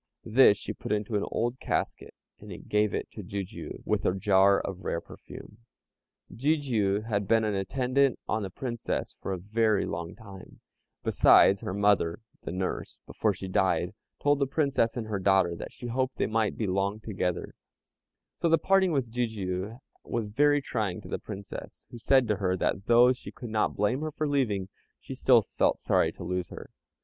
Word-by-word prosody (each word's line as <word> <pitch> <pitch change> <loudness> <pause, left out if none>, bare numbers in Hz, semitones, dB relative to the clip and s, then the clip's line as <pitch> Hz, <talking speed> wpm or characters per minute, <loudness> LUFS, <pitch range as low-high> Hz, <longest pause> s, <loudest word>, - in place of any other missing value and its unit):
This 110 -2 +6
she - - -6
put - - -7
into 105 +1 -1
an 105 - 0
old 120 +3 -2
casket, - - -3 0.2
and - - -10
gave 105 0 +2
it - - -4
to 105 - -8
Jijiu, 95 -3 -6
with - - 0
a 90 - +1
jar 100 0 +4
of 95 -1 -6
rare 85 - -1
perfume. 105 +4 -12 0.8
Jijiu 120 -8 +1
had 105 -3 -2
been 115 +1 +3
an 105 -1 0
attendant 125 +6 +1
on 110 - 0
the 95 - -4
Princess 120 +4 -4
for - - -4
a 95 - -1
very 105 +3 +1
long 85 +1 -5
time, 100 -4 -13 0.4
besides, 100 - +5
her 95 - -4
mother 100 -5 +2 0.2
(the - - -6
nurse), 90 +1 -4
before 110 - 0
she 95 0 -7
died, 95 0 +1 0.3
told 145 0 +2
the 140 - +1
Princess 135 -4 +1
and 115 - -3
her 105 -2 -3
daughter 95 -2 +3
that - - -8
she - - -11
hoped 130 +2 -1
they - - 0
might 110 -1 0
be 110 - -1
long 100 +2 -1
together; 95 -5 -3 0.8
so 170 - 0
the 165 - +5
parting 190 +2 +3
with 135 -7 -1
Jijiu 110 -2 -3 0.2
was 115 -3 -3
very 145 +5 +3
trying 105 -9 -2
to - - -11
the - - -3
Princess 100 0 -9
who 120 - -9
said 130 +1 +3
to 105 -2 +1
her 95 -2 0
that 100 +3 -1
though 120 +2 +6
she 130 - -10
could 120 -4 -9
not 110 -1 0
blame 105 +7 0
her 155 - -2
for 155 +1 -2
leaving, 115 -10 0 0.3
she - - -8
still - - +4
felt - - 0
sorry - - +2
to - - -9
lose 90 -1 -3
her. - - -10
105 Hz, 185 wpm, -28 LUFS, 95-125 Hz, 0.8 s, This